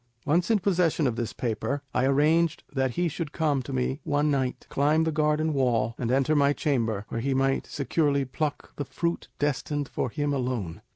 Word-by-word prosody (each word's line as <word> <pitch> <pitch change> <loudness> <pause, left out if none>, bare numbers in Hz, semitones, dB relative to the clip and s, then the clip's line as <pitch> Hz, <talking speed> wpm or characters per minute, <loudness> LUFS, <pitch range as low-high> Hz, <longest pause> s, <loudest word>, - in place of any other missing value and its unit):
Once 170 +6 +2
in 225 - +5
possession 175 -5 +1
of 125 -4 +1
this 120 -1 -2
paper, 130 +4 -2
I 130 - +2
arranged 150 +4 +3
that 130 -3 0
he 175 0 +2
should 160 -1 -4
come 150 -5 +1
to 125 - -8
me 65 +1 -1
one 145 +1 +1
night, 130 -2 -1
climb 150 +3 +2
the 160 - 0
garden 155 +1 +1
wall, 115 -5 +1
and 120 -1 -1
enter 135 +4 +2
my 140 0 +4
chamber, 115 -9 -1
where 115 - -3
he 135 +2 0
might 135 0 +1
securely 140 0 0
pluck 145 +3 -4
the 145 - -2
fruit 170 +5 -2
destined 145 0 -1
for - - -2
him 145 +4 -1
alone. 125 -10 -2
140 Hz, 190 wpm, -27 LUFS, 125-155 Hz, -, in